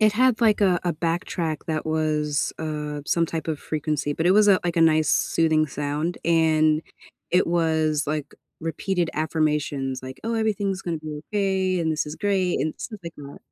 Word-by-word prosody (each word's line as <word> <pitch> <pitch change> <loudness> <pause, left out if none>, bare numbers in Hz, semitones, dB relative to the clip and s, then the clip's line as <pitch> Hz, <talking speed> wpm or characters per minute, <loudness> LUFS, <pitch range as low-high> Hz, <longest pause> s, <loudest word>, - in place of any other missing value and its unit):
It 215 -1 +5
had, 245 +1 +3
like, 215 -3 +4
a 185 -4 +3
a 175 - +1
backtrack 165 -1 -2
that 155 -1 -2
was, 155 -2 0
uh, 150 -2 -4
some 170 -1 +2
type 165 0 -4
of 155 -2 -1
frequency, 150 -1 -2
but 160 - -1
it - - +5
was 210 +1 +5
a 195 -2 +6
like, 175 -1 -1
a - - +3
nice 155 -2 +4
soothing 160 -1 +2
sound. 150 +4 -3
And 155 -2 +3 0.5
it 180 +1 +3
was, 160 -3 +1
like, 150 -1 -3 0.3
repeated 170 +1 -1
affirmations, 150 -4 -1
like, 130 0 -9
"Oh, 230 +1 -1
everything's 205 -4 0
gonna 170 -2 -3
be 155 -1 -7
okay, 190 -2 +1
and 160 -1 +1
this 155 -1 -1
is 150 +1 -6
great." 190 -3 0
And 155 - 0
stuff 215 -4 -7
like 170 -1 -7
that. 140 -1 -10
160 Hz, 185 wpm, -24 LUFS, 155-180 Hz, 0.5 s, a